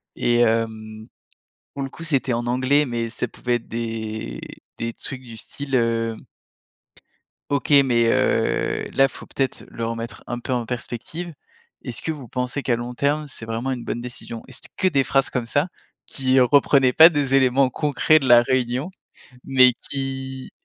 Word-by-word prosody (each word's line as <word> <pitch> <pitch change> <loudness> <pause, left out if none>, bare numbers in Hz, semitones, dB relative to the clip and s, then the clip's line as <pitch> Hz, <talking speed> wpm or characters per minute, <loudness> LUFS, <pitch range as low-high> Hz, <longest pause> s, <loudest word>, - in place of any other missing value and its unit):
et 120 0 +1
hem, 110 -2 0 0.7
pour 140 - -4
le 135 - -4
coup, 165 - -9
c'était 140 -5 0
en 120 +1 -2
anglais, 130 +4 +2
mais 115 -2 -3
ça 125 - -2
pouvait 120 +1 -1
être 120 - -8
des 110 - -4 0.4
des 115 0 -3
trucs 130 +2 -7
du 115 -3 -11
style, 135 +4 -6
hem: 115 -2 +1 1.3
«OK. 140 -2 -1 0.2
Mais, 120 -3 +2
heu, - - +1
là, 135 0 +5
faut - - -11
peut-être 135 -2 -2
le 115 - -5
remettre 115 -1 -6
un 120 - -4
peu 125 +2 -5
en 120 -1 -1
perspective. 130 +8 -6 0.5
Est-ce 120 -4 -4
que - - -2
vous 140 -6 -10
pensez, 125 +3 -3
qu'à 120 -3 +1
long 120 +1 -6
terme, 145 +4 0
c'est 130 - -7
vraiment 115 +4 -3
une 125 -2 -4
bonne 120 - -3
décision?» 120 -1 -7
et 130 - -12
c'était - - -7
que 190 - +3
des 140 -6 +2
phrases 135 0 +2
comme 125 -3 -2
ça, 145 +8 +1 0.4
qui 130 -1 +2
reprenaient 135 0 +4
pas 160 +1 +10
des 145 -4 0
éléments 130 0 +4
concrets 150 +2 +3
de 135 - -4
la 120 -1 +8
réunion, 130 +5 -1 0.5
mais 130 -2 +5 0.2
qui 135 -1 -3
125 Hz, 175 wpm, -22 LUFS, 115-135 Hz, 1.3 s, pas